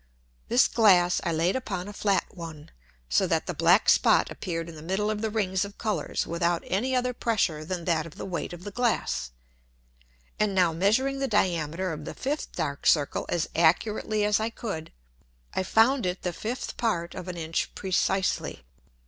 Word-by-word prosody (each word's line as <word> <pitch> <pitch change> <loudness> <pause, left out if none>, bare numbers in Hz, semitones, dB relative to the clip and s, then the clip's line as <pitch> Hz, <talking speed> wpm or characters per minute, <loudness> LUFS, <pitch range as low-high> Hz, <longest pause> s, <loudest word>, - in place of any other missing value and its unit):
This 245 +2 +5
Glass 185 -6 +4
I - - 0
laid 165 +3 +1
upon 195 -7 -3
a 205 - -7
flat 200 -1 +1
one, 160 -4 -9 0.4
so 65 - +2
that - - 0
the - - -3
black - - +4
Spot - - +4
appeared 165 -2 -4
in 170 - -8
the 155 - -10
middle 190 +6 -1
of 210 -1 -3
the 220 - 0
Rings 190 -3 0
of 200 +1 -8
Colours 215 -3 -2
without 170 0 0
any 250 +8 0
other 250 0 +1
Pressure 195 -11 0
than 170 +1 -4
that 165 -2 +1
of 160 - -13
the - - -6
weight 180 -3 -4
of 175 0 -9
the 205 - -6
Glass. 230 - 0 1.1
And 210 -2 +1
now 180 -3 +3
measuring 240 +11 +1
the 270 - 0
Diameter 180 - 0
of 150 -1 -7
the - - -6
fifth 290 +3 -3
dark 140 0 -2
Circle 145 -3 +2
as 170 -2 0
accurately 210 +5 +2
as 210 0 +3
I 220 +1 -1
could, 195 -9 -6 0.6
I - - 0
found 225 +4 +3
it 180 +1 -3
the 180 - -2
fifth 235 +8 -5
part 175 -8 -1
of 185 0 -7
an 180 -1 -5
Inch 160 0 -2
precisely. 190 - 0
185 Hz, 185 wpm, -27 LUFS, 170-215 Hz, 1.1 s, This